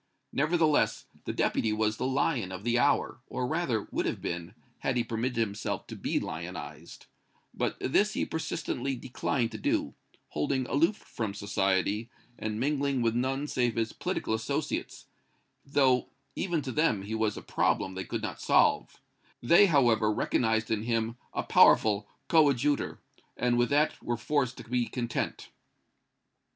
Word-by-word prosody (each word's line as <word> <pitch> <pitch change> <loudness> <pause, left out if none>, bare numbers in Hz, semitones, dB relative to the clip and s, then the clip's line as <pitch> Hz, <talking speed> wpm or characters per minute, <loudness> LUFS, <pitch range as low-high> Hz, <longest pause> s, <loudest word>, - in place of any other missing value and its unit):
Nevertheless, 155 +1 +2 0.2
the - - -2
Deputy 110 - +1
was 110 0 0
the 130 - -1
lion 130 - 0
of 95 +1 -7
the 120 +1 +2
hour, 140 0 +2
or 125 - -3
rather 130 -7 0
would - - -1
have - - -2
been, 85 +3 -5 0.2
had 125 - 0
he 120 - +2
permitted 115 +2 -2
himself 110 -2 -2
to - - -8
be - - -1
lionized, - - -7 0.5
but - - -2
this 205 +10 +2
he - - 0
persistently 140 -4 -3
declined 125 -1 -2
to - - -7
do, - - 0 0.4
holding 130 - -1
aloof 165 +10 +2
from 110 - -5
society 100 +2 0 0.3
and 110 0 -3
mingling 140 -1 0
with 115 -1 +2
none 130 +4 0
save 120 -5 0
his 115 -1 -1
political - - -2
associates, 110 0 -3 0.6
though 135 -3 +2 0.3
even 170 -5 -1
to 130 - -4
them 140 -10 +1
he 105 +3 -5
was 110 -1 0
a - - -7
problem 95 - 0
they 95 0 -4
could - - -4
not - - -4
solve; - - +3 0.4
they, 170 +11 +6
however, 120 - +3
recognized 110 +1 0
in 110 -2 +1
him 115 0 -1 0.2
a - - -2
powerful 105 -1 +5 0.2
coadjutor, 145 -3 +2 0.4
and 125 -1 +2
with 120 0 +2
that 145 +2 +2
were 120 -1 -2
forced 130 +1 0
to - - -8
be 120 0 -1
content. 120 0 -3
120 Hz, 155 wpm, -29 LUFS, 110-140 Hz, 0.6 s, they